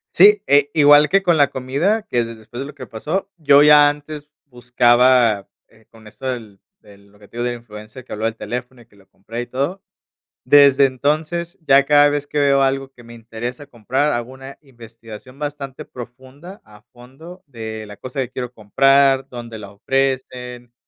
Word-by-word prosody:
Sí, 205 +2 +6
eh, 145 0 +3
igual 145 -1 +6
que 195 +3 +1
con 170 -4 +2
la 145 - +4
comida, 145 - -1
que 120 - -1
de 115 0 -9
después 110 +2 -12
de 135 - -4
lo 145 - -12
que - - -9
pasó, 175 - -5
yo 145 -2 +5
ya 150 -1 +7
antes 150 0 -6 0.2
buscaba, 120 -3 +2 0.2
eh, 110 -1 -25
con 110 -1 -19
esto 105 +5 -13
del 110 -6 -6 0.2
del 100 -1 -19
lo 105 - -24
que 105 - -17
te 115 - -15
digo 120 - -2
del 120 0 -3
influencer, 110 +2 -12
que - - -19
habló 110 +1 -4
del 115 0 -2
teléfono 125 +3 -7
y 115 - -21
que 105 - -27
lo 95 - -23
compré 115 +5 -8
y - - -6
todo, 140 +10 -4 0.6
desde 140 0 +6
entonces, 155 +6 -2
ya 140 0 +5
cada 145 0 +5
vez 145 0 -3
que 145 +1 -3
veo 140 -1 +3
algo 135 0 -1
que 120 - -17
me 120 0 -14
interesa 120 +4 -8
comprar, 130 +4 -2
hago 120 +2 -4
una 135 +1 -12
investigación 115 -1 -14
bastante 145 -2 -7
profunda 130 - -12
a 105 0 -18
fondo 135 +9 -14
de 110 -5 -8
la 105 -1 -12
cosa 130 +1 -6
que 130 -1 -5
quiero 125 -1 -6
comprar, 135 +5 +2
dónde 120 -2 -9
la 100 -1 -11
ofrecen, 125 +1 -3
130 Hz, 195 wpm, -19 LUFS, 115-145 Hz, 0.6 s, ya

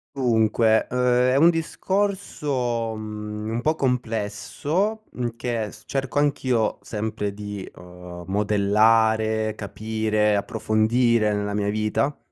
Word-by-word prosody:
Dunque, 110 -3 +3
ehm, 125 0 +2
è - - +2
un 165 +5 +6
discorso, 150 - -1
mhmm, 105 0 -6
un 115 +1 -2
po' 155 +3 +1
complesso, 125 - -1
mhmm, 120 -2 -4
che 115 -3 -3
s - - -15
cerco 135 0 -3
anch'io 130 -7 +1
sempre 105 0 -3
di, 105 -1 -6
ehm, 90 0 -11
modellare, 110 +2 +2
capire, 110 0 0
approfondire 110 +2 +2
nella 105 0 -2
mia 100 0 0
vita, 110 +7 0
110 Hz, 110 wpm, -24 LUFS, 105-125 Hz, -, un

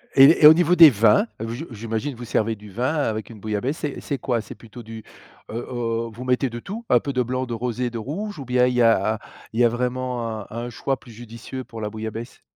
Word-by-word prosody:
Et 140 +4 +7
et - - +13
au 155 - +11
niveau 175 +1 +3
des 165 -3 +10
vins? 110 - +4
Heu, 115 - -3
je 120 +8 -5
je - - -10
j'imagine 115 +5 -3
vous 120 +1 -8
servez 110 0 0
du 105 -1 -13
vin 125 +8 -1
avec 110 -8 -2
une 110 -3 -11
bouillabaisse, 110 +8 -2
c'est 145 -2 -4
c'est 140 - -3
quoi? 120 -2 -1
C'est - - -11
plutôt 115 +1 -12
du, 110 0 -9 0.5
heu - - -6
heu, 115 -2 -2
vous 120 +3 -9
mettez 125 +1 +1
de 120 0 -6
tout? 210 - -7
Un - - +5
peu 140 -3 -4
de 125 - +1
blanc? 130 +2 -2
De 120 - -5
rosé? 125 +1 -2
De 115 - -5
rouge? 175 - -5
Ou 135 - -6
bien 125 0 +3
il 125 - +1
y 125 - +3
a 110 -2 +3 0.3
il 115 - -3
y - - +5
a - - +5
vraiment 120 -2 -3
un - - -11
un 120 +2 -5
choix 120 +4 -2
plus 120 - -15
judicieux 115 +3 -8
pour 115 -2 -10
la 105 - -2
bouillabaisse? 110 +2 -7
120 Hz, 260 wpm, -23 LUFS, 110-130 Hz, 0.5 s, et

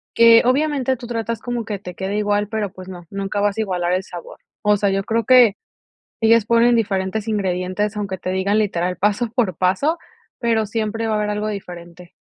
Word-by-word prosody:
que, 230 0 +7
obviamente, 265 0 +1
tú 240 - -9
tratas 230 -1 -3
como 240 0 -4
que 205 -2 -4
te 180 -2 -9
quede 195 +3 -3
igual, 205 0 0
pero, 210 -2 -3
pues, 185 -1 -11
no, 180 -2 -9
nunca 200 +1 -3
vas 205 0 0
a - - +1
igualar 180 -4 -1
el 185 +1 0
sabor. 175 -2 -10 0.2
O 210 0 +3
sea, 200 0 +1
yo 195 0 0
creo 230 +2 0
que 245 -5 +6 0.7
ellas 225 -1 +4
ponen 235 +1 +4
diferentes 205 -1 -1
ingredientes, 195 0 -1
aunque 195 -2 -3
te 185 - -5
digan 200 +3 +1
literal 180 -4 -1
paso 210 +5 +1
por 225 -9 0
paso, 195 - +1 0.4
pero, 230 -2 +1
siempre 225 +1 -2
va 220 - 0
a 215 - +1
haber 210 0 -1
algo 210 +1 -2
diferente. 175 -3 -8
210 Hz, 200 wpm, -20 LUFS, 190-230 Hz, 0.7 s, que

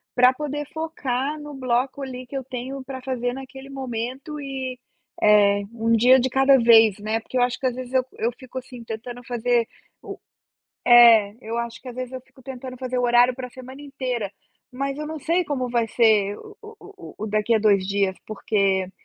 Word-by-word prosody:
pra 250 +1 +6
poder 295 +1 -4
focar 300 -3 -3
no 295 0 -9
bloco 260 +1 -1
ali 255 -1 -6
que 275 - -9
eu 265 - -4
tenho 260 +2 -6
pra 260 0 -7
fazer 250 -1 -2
naquele 270 +1 -10
momento 265 +3 -5
e, 265 -2 -5 0.4
eh, 205 -1 +5
um 230 0 0
dia 255 +3 +6
de 260 - 0
cada 270 +1 +4
vez, 225 -4 +6
né. 215 +2 -2
Porque 255 +3 -4
eu - - +3
acho 245 +1 0
que 265 - -2
às 250 - -4
vezes 255 0 -7
eu 260 -1 +3
eu 230 - 0
fico, 260 0 -8
assim, 250 -2 -10
tentando 235 +2 -7
fazer 240 -1 0 0.4
o - - -8 0.7
é, 230 -4 +7
eu 225 +2 -4
acho 235 -1 -5
que 260 - -9
às 240 - -9
vezes 255 0 -6
eu 260 - -6
fico 260 +1 -22
tentando 255 0 -8
fazer 255 0 -3
o - - +1
horário 245 +1 +4
pra 255 -1 -6
semana 260 +2 -11
inteira, 255 -7 -4 0.4
mas 275 +2 -3
eu 300 - -4
não 315 0 -6
sei 335 +5 +1
como 260 -4 -2
vai 235 -1 +1
ser 215 -3 +3
o 425 -1 -13 0.2
o 395 -1 -13
o - - -2
daqui 215 +2 +1
a - - +2
2 200 -3 +3
dias, 195 -1 0
porque, 195 -3 0
250 Hz, 200 wpm, -23 LUFS, 230-265 Hz, 0.7 s, é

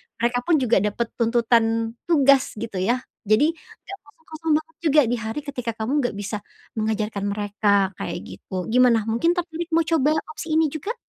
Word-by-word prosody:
mereka 240 +1 0
pun 335 - +4
juga 235 -5 +3
dapat 210 +3 -2
tuntutan 230 -1 +2 0.2
tugas 275 -6 +4
gitu 210 -3 -5
ya. 240 +7 0 0.2
Jadi 260 +10 +4
nggak 390 +4 -13
kosong-kosong 320 +1 -6
banget 320 +1 -9
juga 300 -1 +5
di - - +2
hari 220 +5 -4
ketika 250 -5 -4
kamu 220 +4 -3
enggak 245 - -2
bisa 210 +1 -3 0.4
mengajarkan 215 -2 -2
mereka 205 +1 -1 0.3
kayak - - -4
gitu. 190 - -10 0.2
Gimana 245 -3 +5
mungkin 235 +10 +2
tertarik 340 -1 -3
mau 330 - +4
coba 305 -3 +2 0.2
opsi 325 - -7
ini 320 - +4
juga? 400 - -4
240 Hz, 170 wpm, -23 LUFS, 220-310 Hz, 0.4 s, juga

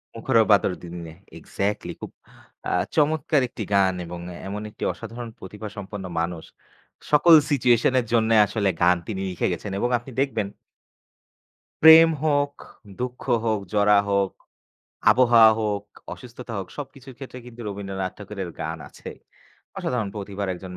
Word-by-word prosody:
মুখর 115 +1 0
বাদর 100 -2 +4
দিনে 85 -1 -8 0.3
exactly 105 +1 -3
আ - - -23
খুব - - -7 0.8
চমৎকার 155 -1 +2
একটি 110 - -6
গান 95 -1 +4
এবং 85 +1 -7 0.3
এমন 105 +2 -5
একটি 105 - -10
অসাধারণ 120 0 -8
প্রতিভা 105 +3 -8
সম্পন্ন 100 -1 -7
মানুষ। 85 -1 -3 0.7
সকল 150 +3 +6 0.2
situation 120 -3 +3
এর 120 - -2
জন্য 110 -1 +3 0.2
আসলে 105 -1 0
গান 90 +1 +5
তিনি 95 -4 -4
লিখে 90 - -1
গেছেন 100 +4 -6
এবং 120 - 0
আপনি 125 +2 -12
দেখবেন 120 -7 -1 1.4
প্রেম 160 +1 +10 0.2
হোক, 145 -1 +1 0.5
দুঃখ 125 0 -4 0.2
হোক, 110 -2 +1
জরা 105 0 +4
হোক, 100 -1 +1 0.8
আবহাওয়া 115 -1 +6
হোক, 105 -2 -1 0.3
অসুস্থতা 125 -1 -10
হোক 95 - -6
সব 145 - -4
কিছুর 130 -1 -13
ক্ষেত্রে 130 -2 -9
কিন্তু 120 -1 -11
রবীন্দ্রনাথ 95 -2 -4
ঠাকুরের 100 -3 -6
গান - - -4
আছে। - - -10 0.7
অসাধারণ 120 -5 -2
প্রতিভার 100 -1 -5
একজন 90 0 -9
105 Hz, 140 wpm, -24 LUFS, 100-125 Hz, 1.4 s, প্রেম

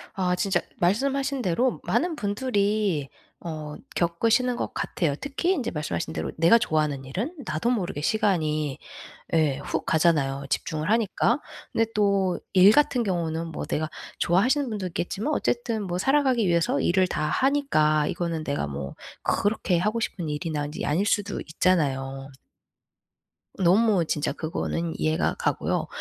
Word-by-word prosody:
아 180 -2 +1
진짜 190 -1 +1 0.2
말씀하신 270 +8 +1
대로 240 +6 +1
많은 345 -1 +1
분들이 205 - 0 0.3
어 155 -3 -6 0.2
겪으시는 230 +9 +2
것 - - -3
같아요. 150 -5 -1
특히 285 +6 -1
인제 255 -9 -2
말씀하신 90 - -3
대로 80 0 -3
내가 170 +8 +6
좋아하는 150 - 0
일은 225 - -4
나도 155 +11 0
모르게 180 - -2
시간이 155 - 0 0.6
예 155 -4 +3
훅 - - -3
가잖아요 145 -4 +2
집중을 155 +4 -2
하니까. 230 +3 +2 0.3
근데 225 - +2
또 200 -3 +2 0.2
일 190 +3 +8
같은 275 -2 +3
경우는 170 -4 -2
뭐 165 - -5
내가 155 +1 -2 0.3
좋아하시는 250 - +2
분도 210 -4 -3
있겠지만 195 - -2
어쨌든 240 -5 -1
뭐 180 -2 -3
살아가기 260 0 +2
위해서 170 -4 +2
일을 185 +5 +3
다 155 - -2
하니까 155 - +2
이거는 165 -3 -2
내가 140 - -2
뭐 70 0 -6 0.3
그렇게 200 -4 +1
하고 215 +5 0
싶은 175 -8 -3
일이나 150 -1 -2
인제 150 - -5
아닐 165 +8 +1
수도 205 -1 0
있잖아요. 135 -6 0 1.3
너무 190 0 +4
진짜 150 -1 -1
그거는 165 0 -3
이해가 155 0 +1
가고요. - - -1
180 Hz, 325 characters per minute, -25 LUFS, 155-225 Hz, 1.3 s, 일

